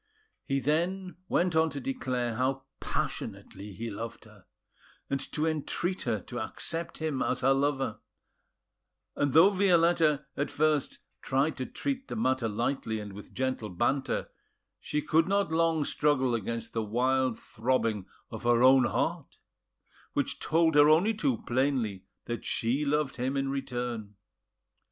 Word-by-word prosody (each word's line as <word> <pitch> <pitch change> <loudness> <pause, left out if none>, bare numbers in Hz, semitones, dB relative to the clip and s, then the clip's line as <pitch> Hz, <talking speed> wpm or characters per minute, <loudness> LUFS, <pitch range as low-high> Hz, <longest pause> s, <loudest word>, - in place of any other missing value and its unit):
He 135 0 0
then 175 +6 -1
went 175 -1 +2
on 160 0 +4
to 140 -1 -5
declare 125 -2 -2
how 130 +3 -1 0.2
passionately 100 +2 -4
he 115 +4 -5
loved 115 +3 -7
her, - - -18 0.6
and 140 - +1
to 155 - 0
entreat 160 +4 -1
her 110 -2 +1
to 120 - -6
accept 165 +9 -3
him 155 -4 -2
as 130 - 0
her 135 +1 +4
lover; 135 -4 0 1.2
and 145 -1 +1
though 170 +6 +7
Violetta 170 -6 +3
at 145 - -1
first 155 -2 +1 0.2
tried 135 +4 +1
to 130 - -3
treat 270 -1 -3
the - - -5
matter 130 - +1
lightly 110 0 -1
and 105 -2 -7
with 100 +1 -11
gentle 130 -4 -2
banter, 120 +9 0 0.5
she 150 - -2
could 160 +2 +3
not 200 -2 +1
long 160 -2 +2
struggle 130 -5 +2
against 115 0 -3
the 115 - 0
wild 125 +3 +1
throbbing 115 -4 -1 0.2
of - - -6
her 120 0 +3
own 130 -1 +7
heart, - - -2 0.8
which - - -1
told 160 0 +2
her 145 0 +7
only 175 +9 +4
too 240 +5 -1
plainly 120 -7 0 0.2
that 120 0 -4
she 125 +6 0
loved 145 -1 0
him 130 +3 -1
in 135 0 0
return. 120 -6 -4
135 Hz, 145 wpm, -29 LUFS, 120-160 Hz, 1.2 s, though